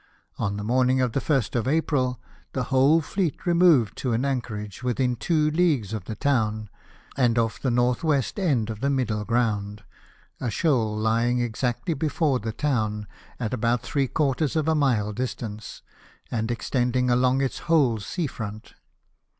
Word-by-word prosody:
On 100 0 -1
the 105 - -4
morning 130 +3 +2
of 125 -2 +1
the 135 - 0
1st 135 -6 0
of 120 0 0
April, 135 -5 +1 0.3
the 130 - -1
whole 140 +5 +5
fleet 170 -1 -2
removed 170 - +4
to 125 -3 -1
an 120 +4 0
anchorage 110 -7 -4
within 125 0 0
two 155 +4 +1
leagues 150 - +1
of 105 -5 -4
the 110 - -5
town, 110 -5 0 0.4
and 120 -3 +2
off 115 -1 0
the - - -1
N.W. 125 +5 +2 0.2
end 135 - 0
of 110 - -7
the 140 - +1
Middle 115 -6 0
Ground 105 -3 -1 0.3
— - - -32
a 125 - -1
shoal 115 -7 +1
lying 115 +3 +1
exactly 120 +5 -1
before 150 -2 0
the 110 +1 -4
town, 110 -6 -1 0.3
at 115 -2 -2
about 120 0 0
three 140 -2 0
quarters 145 +1 0
of 155 -1 0
a 160 - +3
mile 120 -9 +1
distance, 110 -3 -5 0.5
and 110 -1 -1
extending 125 +1 0
along 125 +2 +3
its 135 - -2
whole 135 -9 +3
sea 165 - -3
front. 110 -5 -7
125 Hz, 165 wpm, -25 LUFS, 110-140 Hz, 0.5 s, whole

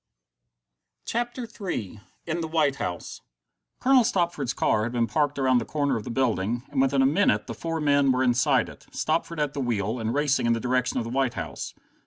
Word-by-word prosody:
CHAPTER 240 +1 -2
III 175 - -5 0.2
In 170 +1 -2
the 160 - -2
White 155 -4 +1
House 90 -9 -5 0.6
Colonel 260 -1 +5
Stopford's 170 - 0
car 110 - +1
had 115 +3 -2
been 120 -1 +2
parked 145 +3 0
around 130 -2 +3
the - - -3
corner 145 -3 0
of 110 - -4
the - - -5
building, 115 -2 0
and 135 -2 +1
within 135 0 +3
a - - +4
minute 170 +10 +2
the - - -5
four 165 -1 -3
men 140 -2 +3
were 130 0 +2
inside 120 -1 +3
it, - - -13
Stopford 165 +1 -1
at 145 -2 0
the 145 - -4
wheel, 115 -1 -1
and 110 0 -1
racing 145 -4 +2
in 115 - +4
the 115 - -1
direction 125 +1 0
of - - 0
the 115 - -6
White 130 -2 0
House. - - -5
135 Hz, 205 wpm, -26 LUFS, 120-155 Hz, 0.6 s, Colonel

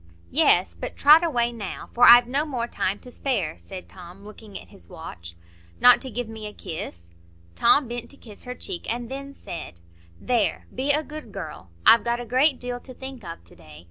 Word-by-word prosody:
"Yes; 180 +2 +3
but 250 - -7
trot 305 +4 +7
away 240 -8 +1
now, 215 -5 -7
for 245 +1 +5
I've 240 0 +9
no 275 +5 0
more 255 -6 -3
time 195 -4 -2
to 250 - -12
spare," 205 - -2
said 190 -2 -10
Tom, 180 +1 -13
looking 210 -1 -11
at - - -15
his 85 - -17
watch. 85 0 -10 0.4
"Not 245 -1 +7
to 260 - -5
give 245 0 -4
me 220 -1 -8
a 210 - -9
kiss?" 85 - -7 0.4
Tom 260 - +4
bent 240 0 -6
to 280 - -11
kiss 215 -6 -13
her 250 0 -6
cheek, 365 - -5
and 235 0 -4
then 275 +1 -6
said,— 165 - -9 0.4
"There! 240 -4 0
Be 265 +3 -2
a 300 +2 +3
good 300 -7 -9
girl. 150 - -8 0.2
I've 230 - +7
got 235 0 -1
a 245 - -6
great 260 +4 +2
deal 245 0 -4
to 255 0 -12
think 265 -3 -9
of 165 - -8
to 85 - -19
day. 75 0 -14
240 Hz, 205 wpm, -24 LUFS, 190-260 Hz, 0.4 s, I've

